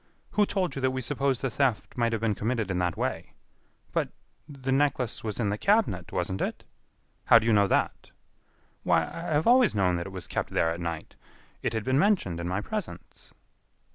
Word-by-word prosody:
"Who 210 -1 +3
told 185 -7 -1
you 135 - -4
that 130 - +3
we 130 0 -3
supposed 135 0 -1
the 135 - 0
theft 130 -2 0
might 120 -2 +1
have 115 -1 -2
been 115 -2 +1
committed 110 -1 -1
in 90 - -1
that 90 -2 -1
way?" - - -3 0.6
"But.... - - 0 0.4
the 135 -2 -4
necklace 135 -3 +1
was 110 -1 -4
in 105 -4 +1
the 105 +1 -2
cabinet, 200 - +1
wasn't 95 +2 -2
it?" - - -3 0.6
"How 115 - +8
do 115 - +1
you 115 - +3
know 100 -1 +4
that?" - - 0 0.7
"Why, - - +3
I - - -7
have 155 -2 0
always 245 - +5
known 90 -3 +2
that 85 - -4
it - - -8
was 95 -1 -5
kept - - -3
there 80 - +2
at 85 - -4
night. 85 -2 -5 0.5
It - - -1
had 110 -1 -2
been 130 +4 +2
mentioned 175 - +2
in 85 - -3
my 95 +3 -1
presence." 210 - -7
115 Hz, 205 wpm, -27 LUFS, 95-140 Hz, 0.7 s, How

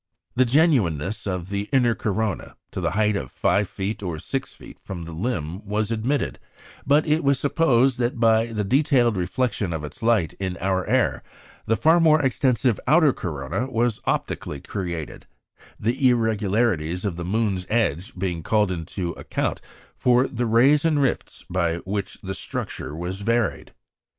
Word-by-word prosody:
The 130 - +4
genuineness 110 - +2
of 90 -1 -3
the 100 +1 -2
"inner 125 -4 +3
corona" 110 -1 -2 0.2
to - - -4
the - - -1
height 105 -1 +3
of 65 -10 -3
5' 100 -1 0 0.2
or 90 -5 -3
6' - - -4 0.2
from 90 -3 -7
the 85 - -8
limb 90 -1 -3
was 105 +1 -1
admitted; 120 +6 -1 0.5
but 145 +2 +4
it 155 +2 +1
was 140 -1 +3
supposed 135 -3 +2
that 120 0 -1
by 115 0 +4
the 110 -3 -2
detailed 125 0 +3
reflection 95 +2 -1
of 80 -2 -3
its 75 - -8
light 110 -8 +2
in 95 -2 -3
our 95 0 -1
air - - +1 0.5
the 115 - +3
far 165 +2 +5
more 155 -2 +5
extensive 130 -3 +1
"outer 155 -3 +5
corona" 75 - -3
was 120 -2 0
optically 75 - -2
created, 85 -3 -5 0.5
the 125 +4 +2
irregularities 105 -6 +1
of 95 -4 -1
the 85 - -5
moon's 95 -1 -1
edge 100 -6 0
being 90 -3 -2
called 105 +2 +1
in 85 -3 -4
to 90 0 -4
account - - -3 0.3
for 125 +1 +3
the 120 -1 -2
rays 130 +6 +4
and 160 -3 +2
rifts 135 -3 -2
by 85 -2 0
which 100 0 -3
its 95 0 -4
structure 75 - -5
was 90 +4 -4
varied. 115 +1 0
110 Hz, 160 wpm, -24 LUFS, 90-125 Hz, 0.5 s, far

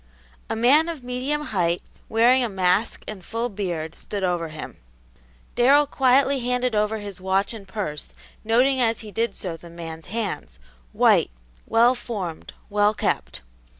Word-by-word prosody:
A - - -1
man 280 +9 +4
of 315 -6 -6
medium 255 +4 -2
height, 175 -2 +1 0.3
wearing 245 +3 +4
a 240 - -1
mask 190 +2 +1
and 205 -4 -7
full 230 +5 -2
beard, 175 -6 -3
stood 200 -2 -6
over 175 -2 0
him. 155 0 -8 0.8
Darrell 280 +4 +5
quietly 270 0 +3
handed 250 0 0
over 210 +1 +1
his 200 -3 -7
watch 190 +3 0
and 205 -4 -10
purse, 190 -7 -5 0.3
noting 250 +4 +3
as 230 -1 +1
he 215 -2 -9
did 230 +3 -1
so 175 -4 -4
the 170 +1 -12
man's 165 -1 -8
hands, 195 - -4 0.3
white, - - +4 0.4
well 235 +2 +5
formed, 200 -10 -5 0.2
well 205 +1 +2
kept. - - -2
215 Hz, 150 wpm, -24 LUFS, 185-245 Hz, 0.8 s, Darrell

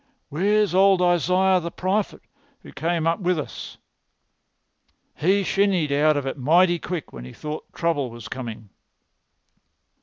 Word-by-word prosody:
Where's 205 +5 +1
old 190 0 +5
Isaiah 180 +2 +3
the 170 -1 -5
prophet 190 +4 -2 0.4
who - - -13
came 165 +2 -1
up 165 0 +1
with 180 -2 0
us?" 150 - -7 1.4
"He 195 +6 +1
shinned 190 -6 +1
out 150 +1 +3
of 140 - -3
it 135 +1 -4
mighty 170 +6 +3
quick 175 -2 -6
when 60 - -9
he 65 - -10
thought 150 +1 -7
trouble 155 -6 -1
was 115 -2 -10
coming." 115 -5 -7
170 Hz, 140 wpm, -23 LUFS, 145-185 Hz, 1.4 s, old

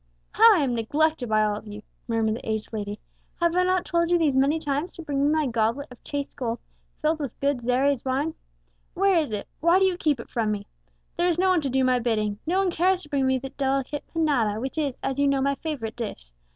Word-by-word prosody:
"How 450 0 +7
I 320 - +2
am 255 -3 0
neglected 285 +3 0
by 215 0 +3
all 210 -1 +1
of 215 - -10
you!" 210 0 -8 0.2
murmured 225 -2 +1
the - - -8
aged 220 +1 -3
lady. 205 -1 -4 0.4
"Have 340 0 +2
I 365 - +4
not 370 0 +1
told 340 -1 +1
you 350 - +4
these 305 -5 +2
many 275 +4 +3
times 300 +2 -2
to 335 - -8
bring 280 -3 -1
me 290 - +3
my 310 -1 +2
goblet 235 +3 -1
of 250 - -14
chased 285 -1 -4
gold, 235 -4 -2 0.5
filled 310 +1 +2
with 280 -6 -5
good 280 -2 +1
Xeres 255 +2 +1
wine? 275 +5 -1 0.6
Where 390 0 +3
is 310 -8 +1
it 210 -1 -4
why 340 +3 +4
do 385 - +4
you 370 -2 +1
keep 295 -7 +1
it - - -10
from 220 -3 0
me? 205 -1 -3 0.5
There 350 +1 +2
is 340 - 0
no 375 +1 +3
one 365 -3 +3
to 280 - -2
do 265 +1 +2
my 255 -1 +3
bidding, 215 -3 -1
no 360 +3 +1
one 385 -2 +2
cares 365 +2 +1
to 295 - -14
bring 275 -3 +1
me 260 0 +2
the 265 +1 -6
delicate 275 +1 -1
panada 265 -10 +1
which 265 +6 -3
is, 280 -5 -1
as 270 0 -2
you 285 - +3
know, 275 -1 +2
my 280 +1 +1
favourite 275 -7 -5
dish. 205 - -6
275 Hz, 245 wpm, -25 LUFS, 235-320 Hz, 0.6 s, How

